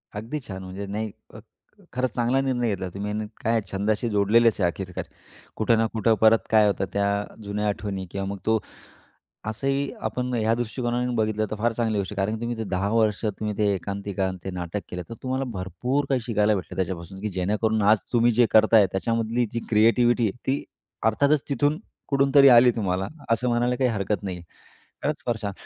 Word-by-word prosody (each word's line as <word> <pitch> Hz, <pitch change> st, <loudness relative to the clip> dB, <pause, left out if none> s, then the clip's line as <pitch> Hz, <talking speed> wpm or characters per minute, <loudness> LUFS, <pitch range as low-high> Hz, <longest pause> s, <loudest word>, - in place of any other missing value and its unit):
अगदी 115 Hz, +9 st, -4 dB
छान. 95 Hz, -1 st, -6 dB
म्हणजे 95 Hz, +2 st, -6 dB
नाही 105 Hz, +2 st, -3 dB, 0.2 s
अ, -, -, -9 dB, 0.5 s
खरंच 125 Hz, -1 st, 0 dB
चांगला 120 Hz, +2 st, +2 dB
निर्णय 125 Hz, -3 st, 0 dB
घेतला 95 Hz, -3 st, -3 dB
तुम्ही 100 Hz, +1 st, -4 dB
आणि 105 Hz, +1 st, -2 dB, 0.2 s
काय 115 Hz, 0 st, +2 dB
छंदाशी 105 Hz, +4 st, 0 dB
जोडलेलेच 105 Hz, +2 st, +3 dB
आहे 90 Hz, -, +3 dB
आखिरकार. 90 Hz, +1 st, -4 dB, 0.5 s
कुठं 110 Hz, +1 st, +2 dB
ना 115 Hz, -, +2 dB
कुठं 110 Hz, 0 st, +3 dB
परत 110 Hz, 0 st, +5 dB
काय 110 Hz, -1 st, +5 dB
होतं 100 Hz, -1 st, 0 dB
त्या 100 Hz, 0 st, +1 dB, 0.4 s
जुन्या 105 Hz, +1 st, -2 dB
आठवणी 100 Hz, -2 st, -3 dB
किंवा 100 Hz, 0 st, -3 dB
मग 100 Hz, 0 st, -4 dB
तो 110 Hz, 0 st, +3 dB, 0.9 s
असंही 135 Hz, +6 st, -1 dB, 0.2 s
आपण 125 Hz, +3 st, -3 dB
ह्या 110 Hz, -1 st, +2 dB
दृष्टिकोनाने 120 Hz, +1 st, -2 dB
बघितलं 110 Hz, -1 st, 0 dB
तर 110 Hz, -, -3 dB
फार 115 Hz, +2 st, +1 dB
चांगली 110 Hz, -2 st, -1 dB
गोष्ट 100 Hz, +1 st, -3 dB
आहे, -, -, -8 dB
कारण 100 Hz, +2 st, 0 dB
की 110 Hz, -, -6 dB
तुम्ही 120 Hz, 0 st, -3 dB
जर 110 Hz, -, -3 dB
10 95 Hz, +1 st, 0 dB
वर्ष 110 Hz, -2 st, +2 dB
तुम्ही 105 Hz, 0 st, -3 dB
ते 105 Hz, -1 st, +3 dB
एकांकिका 100 Hz, 0 st, -3 dB
आणि 95 Hz, -, -5 dB
ते 95 Hz, -, -3 dB
नाटक 90 Hz, +2 st, -4 dB
केलं 90 Hz, 0 st, -4 dB
तर 115 Hz, -, -6 dB
तुम्हाला 130 Hz, +1 st, -1 dB
भरपूर 105 Hz, -, -2 dB
काही 135 Hz, -2 st, +1 dB
शिकायला 110 Hz, -2 st, +1 dB
भेटलं 95 Hz, -3 st, -5 dB
त्याच्यापासून, 95 Hz, 0 st, -4 dB
की 105 Hz, -, -2 dB
जेणेकरून 105 Hz, +3 st, 0 dB
आज 105 Hz, +2 st, +5 dB
तुम्ही 120 Hz, 0 st, +4 dB
जे 120 Hz, +1 st, +4 dB
करताय 110 Hz, -1 st, +6 dB
त्याच्यामधली 115 Hz, +4 st, 0 dB
जी 115 Hz, -, -2 dB
क्रिएटिव्हिटी 115 Hz, +2 st, +4 dB
आहे, -, -, -4 dB
ती 135 Hz, +2 st, 0 dB, 0.5 s
अर्थातच 140 Hz, +6 st, +2 dB
तिथून 145 Hz, +2 st, +1 dB, 0.3 s
कुठून 140 Hz, -1 st, +2 dB
तरी 140 Hz, -1 st, +9 dB
आली 125 Hz, 0 st, +8 dB
तुम्हाला 95 Hz, -3 st, -1 dB, 0.2 s
असं 115 Hz, +2 st, +2 dB
म्हणायला 120 Hz, +1 st, +1 dB
काही 125 Hz, -1 st, +2 dB
हरकत 100 Hz, -2 st, -1 dB
नाही 95 Hz, -3 st, -4 dB
आहे. 85 Hz, -, -11 dB, 0.6 s
खरंच 150 Hz, +1 st, -2 dB
फार 120 Hz, -2 st, +1 dB
छान. 100 Hz, -1 st, -2 dB
110 Hz, 195 wpm, -25 LUFS, 100-120 Hz, 0.9 s, तरी